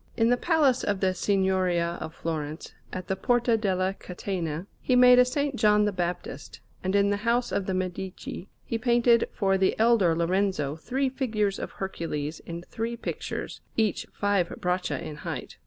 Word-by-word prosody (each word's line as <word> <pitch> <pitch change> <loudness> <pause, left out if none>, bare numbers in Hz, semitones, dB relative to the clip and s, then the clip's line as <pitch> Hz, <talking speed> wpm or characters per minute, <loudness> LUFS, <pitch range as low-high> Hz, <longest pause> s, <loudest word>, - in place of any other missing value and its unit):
In 225 0 +3
the 245 - +5
Palace 285 -3 +2
of 205 -2 0
the 190 -1 +2
Signoria 185 -3 +1
of 160 - -6
Florence, 155 -1 -4 0.2
at 185 -1 -6
the 190 - 0
Porta 240 +3 +2
della 190 -3 0
Catena, 175 -3 -4 0.2
he 255 - +2
made 250 0 +8
a - - +10
S. 250 +3 0 0.2
John 210 -3 +4
the 210 - +1
Baptist; 175 -6 -4 0.2
and 190 +1 0
in 200 0 +4
the 205 - +1
house 235 +3 0
of 195 - -1
the 190 - 0
Medici 185 +1 -5 0.2
he 230 - -2
painted 235 0 +3
for 195 -1 +1
the 190 - +2
elder 220 -7 +4
Lorenzo 170 -4 0
three 260 +11 -1
figures 220 -7 -1
of - - -5
Hercules 160 -5 -4
in 170 0 -6
three 230 +5 -4
pictures, - - -5 0.2
each 220 -3 +1
five 200 -4 +1
braccia 180 -6 -1
in 150 - -7
height. - - -6
195 Hz, 170 wpm, -27 LUFS, 175-230 Hz, 0.2 s, a